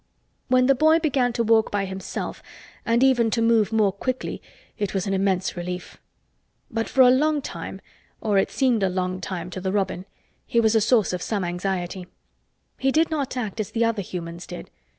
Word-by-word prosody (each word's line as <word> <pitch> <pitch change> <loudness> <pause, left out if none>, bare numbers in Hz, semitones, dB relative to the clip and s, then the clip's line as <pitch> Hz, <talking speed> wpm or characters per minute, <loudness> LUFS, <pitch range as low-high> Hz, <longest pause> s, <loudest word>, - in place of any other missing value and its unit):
When 255 0 +4
the 275 - +5
boy 315 +4 +4
began 275 -6 +1
to 235 - 0
walk 225 0 +3
by 200 -1 -1
himself 190 0 -5 0.5
and 235 +2 +3
even 245 -4 +4
to 230 - 0
move 230 -2 +3
more 215 -3 +3
quickly 255 +6 -4 0.4
it 205 -1 -2
was 190 - 0
an 195 - -1
immense 190 -1 0
relief. 180 +1 -6 0.7
But 225 0 -2
for 265 - +3
a 250 -1 +8
long 300 +3 +2
time—or 215 -6 -4
it - - +1
seemed 250 -5 +1
a 190 - +2
long 185 0 -2
time 180 -1 -5
to 185 - -6
the 190 0 -1
robin—he 195 +3 -3
was 220 -1 +3
a 220 - +4
source 225 -3 +3
of 180 - -3
some 205 -4 -2
anxiety. 180 0 -3 0.7
He 270 0 +2
did 320 +3 +2
not 280 -4 -2
act 220 -3 -4
as 215 - -2
the 230 0 +1
other 230 -3 0
humans 170 -2 -7
did. 60 - -9
215 Hz, 190 wpm, -24 LUFS, 190-250 Hz, 0.7 s, a